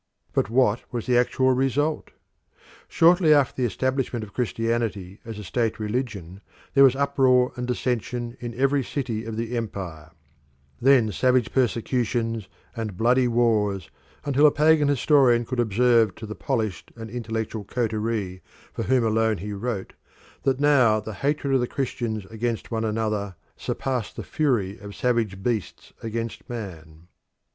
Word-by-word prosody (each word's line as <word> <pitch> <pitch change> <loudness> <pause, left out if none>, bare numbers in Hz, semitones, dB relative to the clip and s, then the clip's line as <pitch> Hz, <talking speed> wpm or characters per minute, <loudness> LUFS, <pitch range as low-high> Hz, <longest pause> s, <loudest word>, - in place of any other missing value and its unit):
But - - +1
what 120 -2 +2
was 120 -2 -3
the 125 - +2
actual 130 +2 +3
result? 135 +4 0 0.8
Shortly 165 -2 +5
after 140 -3 +2
the 125 - +3
establishment 130 -1 -1
of 100 - -11
Christianity 115 -5 -2
as 110 -2 -7
a 105 - -7
state 115 +4 -1
religion 105 -5 -4 0.3
there 140 - +6
was 135 -1 +6
uproar 135 -3 +3
and 125 0 -4
dissension 120 -1 -2
in 120 -1 -6
every 135 +2 +2
city 120 -5 -3
of 110 -1 -5
the 115 +1 -3
Empire; 90 -9 -5 0.7
then 125 -4 +5
savage 125 +1 +2
persecutions 115 -3 0 0.3
and 110 -5 -4
bloody 125 +3 +3
wars, 110 -5 +1 0.3
until 145 +1 +5
a - - +4
pagan 150 0 +4
historian 135 -4 +4
could 125 +1 -4
observe 115 -2 +3
to 110 - -8
the 110 - -6
polished 110 - -3
and 115 -2 -8
intellectual 110 -2 -4
coterie 110 -4 -2 0.3
for - - -4
whom 130 -1 +2
alone 110 -1 +2
he 105 +2 -5
wrote 100 -1 -4 0.5
that 135 -1 0
now 130 -7 +4
the 110 +1 -7
hatred 140 +3 -1
of 135 - +4
the 120 - 0
Christians 120 -6 -3
against 115 +1 -3
one 110 -1 -1
another 105 -3 -2 0.2
surpassed 125 -5 -3
the - - -6
fury 115 -9 0
of 100 0 -9
savage 115 -6 0
beasts 115 -5 -3
against 115 0 -5
man. 85 -8 -8
115 Hz, 150 wpm, -24 LUFS, 110-130 Hz, 0.8 s, there